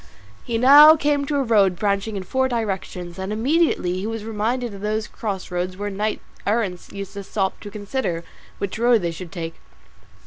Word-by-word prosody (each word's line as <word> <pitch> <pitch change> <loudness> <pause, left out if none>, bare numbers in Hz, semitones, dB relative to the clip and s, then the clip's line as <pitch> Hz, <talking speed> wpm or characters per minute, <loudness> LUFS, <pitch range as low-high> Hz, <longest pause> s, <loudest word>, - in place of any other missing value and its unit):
He 230 - -2
now 290 +6 +9
came 290 -2 +1
to 300 - -1
a 280 - +2
road 205 -6 +3
branching 200 +2 -1
in 190 - -4
four 260 +7 0
directions, 190 -7 -4
and 190 +2 -4
immediately 250 - +1
he 200 - -3
was 225 -1 -4
reminded 225 +2 -2
of 195 - -9
those 215 +1 -1
cross 195 -4 -5
roads 180 +1 -2
where 205 +1 -3
knights 210 +2 -2 0.3
errant 205 -5 -1
used 200 -1 -7
to 200 -1 -6
stop 190 -1 -2
to 205 - -8
consider 205 -4 -3 0.3
which 200 +2 -4
road 235 -3 +4
they 170 - 0
should 165 +1 -8
take. 165 -3 -5
210 Hz, 185 wpm, -22 LUFS, 190-235 Hz, 0.3 s, now